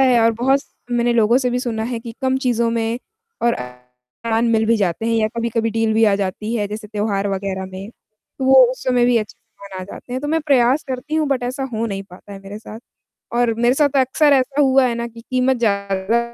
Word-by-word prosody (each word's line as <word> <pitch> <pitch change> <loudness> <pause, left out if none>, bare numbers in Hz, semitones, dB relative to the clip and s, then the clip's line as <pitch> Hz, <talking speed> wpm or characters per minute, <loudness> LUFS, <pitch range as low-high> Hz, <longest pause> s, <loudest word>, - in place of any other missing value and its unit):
है 255 -3 +5
और 230 0 +4
बहुत 270 +2 +3 0.3
मैंने 240 0 +1
लोगों 235 +2 +4
से 250 -2 0
भी 245 - 0
सुना 225 -3 -3
है 235 - -2
कि 230 0 -8
कम 260 0 +2
चीज़ों 235 -1 +1
में 230 +1 -1 0.4
और 235 0 +3
अ, - - -5 0.6
सामान 230 +1 +1
मिल 220 -1 +2
भी 230 - +3
जाते 200 +1 -1
हैं 230 - +1
या 215 -1 +2
कभी-कभी 230 -1 -1
डील 225 0 0
भी 225 - +4
आ 205 -2 +4
जाती 205 +3 -3
है, 210 -3 0
जैसे 210 0 -7
त्योहार 205 -1 -1
वग़ैरह 190 -1 -3
में, 190 +2 -8 0.5
तो 265 - -2
वो 265 -1 +7
उस 255 - -7
समय 250 -2 +2
भी 245 -1 +3
अच्छे 215 -2 -6
सामान 195 -2 -11
आ - - -6
जाते 245 - -10
हैं, 255 - -2
तो 290 - -3
मैं 320 +1 +1
प्रयास 265 0 +3
करती 260 +4 -4
हूँ, 310 -2 +1
बट 265 -3 0
ऐसा 255 +3 -3
हो 225 +1 -1
नहीं 195 -2 -4
पाता 190 +3 -13
है 195 - -8
मेरे 200 +2 -8
साथ 220 +1 -10 0.6
और 240 -2 +2
मेरे 240 +2 +2
साथ 285 -2 +2
अक्सर 285 +3 +3
ऐसा 275 +2 +2
हुआ 265 -1 +4
है 235 - -2
ना 235 0 -3
कि 230 0 -13
कीमत 255 0 +2
ज़्यादा 200 0 0
230 Hz, 240 wpm, -20 LUFS, 210-255 Hz, 0.6 s, वो